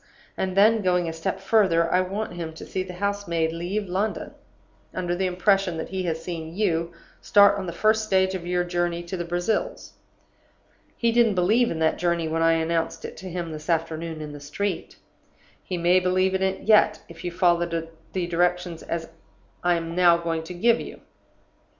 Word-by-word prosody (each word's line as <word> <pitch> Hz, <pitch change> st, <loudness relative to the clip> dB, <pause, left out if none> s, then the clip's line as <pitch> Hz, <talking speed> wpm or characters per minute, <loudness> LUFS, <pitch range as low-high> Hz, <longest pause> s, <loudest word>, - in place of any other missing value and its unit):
And 190 Hz, 0 st, -2 dB
then, 220 Hz, +2 st, +5 dB
going 180 Hz, -2 st, +1 dB
a 165 Hz, -, -3 dB
step 165 Hz, 0 st, -3 dB
further, 170 Hz, -7 st, +2 dB
I 180 Hz, -, +4 dB
want 195 Hz, +2 st, -3 dB
him 165 Hz, -2 st, -5 dB
to -, -, -9 dB
see 190 Hz, -, -3 dB
the 185 Hz, -1 st, -7 dB
house 200 Hz, +1 st, -2 dB
maid 165 Hz, -1 st, 0 dB
leave 185 Hz, +5 st, -3 dB
London, 195 Hz, +4 st, -2 dB, 0.6 s
under 175 Hz, -1 st, -1 dB
the 190 Hz, +1 st, 0 dB
impression 185 Hz, -1 st, +1 dB
that 160 Hz, -, -5 dB
he 190 Hz, 0 st, -3 dB
has 160 Hz, -1 st, -2 dB
seen 165 Hz, -2 st, -6 dB
you 170 Hz, -5 st, 0 dB, 0.3 s
start 200 Hz, 0 st, +5 dB
on 190 Hz, -, -5 dB
the -, -, -3 dB
first 220 Hz, +4 st, +2 dB
stage 190 Hz, -2 st, +2 dB
of 175 Hz, -2 st, -5 dB
your 180 Hz, 0 st, +1 dB
journey 175 Hz, -1 st, -1 dB
to 175 Hz, +2 st, -5 dB
the 175 Hz, -, -3 dB
Brazils. 175 Hz, -, -2 dB, 1.0 s
He 235 Hz, -1 st, +2 dB
didn't 230 Hz, -3 st, +3 dB
believe 215 Hz, +7 st, +3 dB
in 165 Hz, -, -3 dB
that 160 Hz, -, +2 dB
journey 170 Hz, -2 st, 0 dB
when 165 Hz, +1 st, -1 dB
I 165 Hz, 0 st, +5 dB
announced 165 Hz, 0 st, -1 dB
it -, -, -7 dB
to 185 Hz, +2 st, -8 dB
him 170 Hz, -2 st, -4 dB
this 155 Hz, +1 st, -8 dB
afternoon 165 Hz, -1 st, -2 dB
in 150 Hz, -1 st, -6 dB
the 145 Hz, -, -8 dB
street. 155 Hz, +8 st, -4 dB, 0.7 s
He 180 Hz, -, -4 dB
may 175 Hz, +2 st, +4 dB
believe 185 Hz, +1 st, +1 dB
in 190 Hz, -, 0 dB
it 190 Hz, 0 st, 0 dB
yet, 210 Hz, 0 st, +4 dB
if 170 Hz, -, -12 dB
you 175 Hz, -, -2 dB
follow 175 Hz, -1 st, +2 dB, 0.4 s
the 185 Hz, -2 st, -1 dB
directions 175 Hz, 0 st, 0 dB, 0.8 s
I 175 Hz, 0 st, +3 dB
am 165 Hz, 0 st, -4 dB
now 175 Hz, -2 st, +5 dB
going 165 Hz, -1 st, -2 dB
to 180 Hz, +2 st, -7 dB
give 235 Hz, +6 st, +3 dB
you. -, -, -9 dB
180 Hz, 195 wpm, -25 LUFS, 170-190 Hz, 1.0 s, then